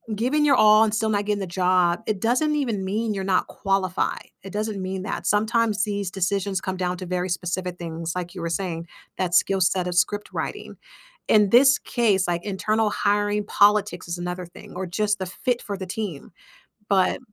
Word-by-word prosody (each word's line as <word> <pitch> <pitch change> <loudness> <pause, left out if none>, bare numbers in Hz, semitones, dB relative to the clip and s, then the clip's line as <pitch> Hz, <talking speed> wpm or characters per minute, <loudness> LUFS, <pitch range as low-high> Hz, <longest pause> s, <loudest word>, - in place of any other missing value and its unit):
giving 260 +7 +1
your 280 - +5
all 215 -2 +6
and 215 -1 0
still 220 0 0
not 205 -1 0
getting 210 -1 0
the 195 - -3
job, 180 0 +2
it 215 -3 -1
doesn't 255 +8 +1
even 235 -9 -1
mean 215 +3 -1
you're 195 -1 -3
not 190 -1 +1
qualified, 195 -2 -1 0.2
it 195 - -8
doesn't 210 -2 -2
mean 185 0 -4
that. - - -4
Sometimes 220 0 +2
these 200 -3 -2
decisions 190 0 -1
come 190 0 -3
down 180 -1 -2
to 185 - -6
very 180 +1 -2
specific 180 +1 -3
things, 165 -1 -5
like 175 0 -5
you 180 - -6
were 170 - -2
saying, 170 -1 -3 0.3
that 180 -2 0
skill-set 185 0 +2
of 175 - -3
script 205 +3 +1
writing. - - -5 0.5
In 210 -2 +5
this 270 +3 +7
case, 205 -6 +1
like 175 -1 -1
internal 215 +2 0
hiring 205 0 0
politics 205 -2 +2
is 170 +1 -3
another 180 +1 -4
thing 175 - -14
or 190 +1 -3
just 210 +3 0
the 185 - -3
fit 245 +6 -2
for 200 -1 -5
the 190 - -5
team, 185 -6 -5 0.6
but 190 -2 +2
195 Hz, 195 wpm, -24 LUFS, 180-210 Hz, 0.6 s, this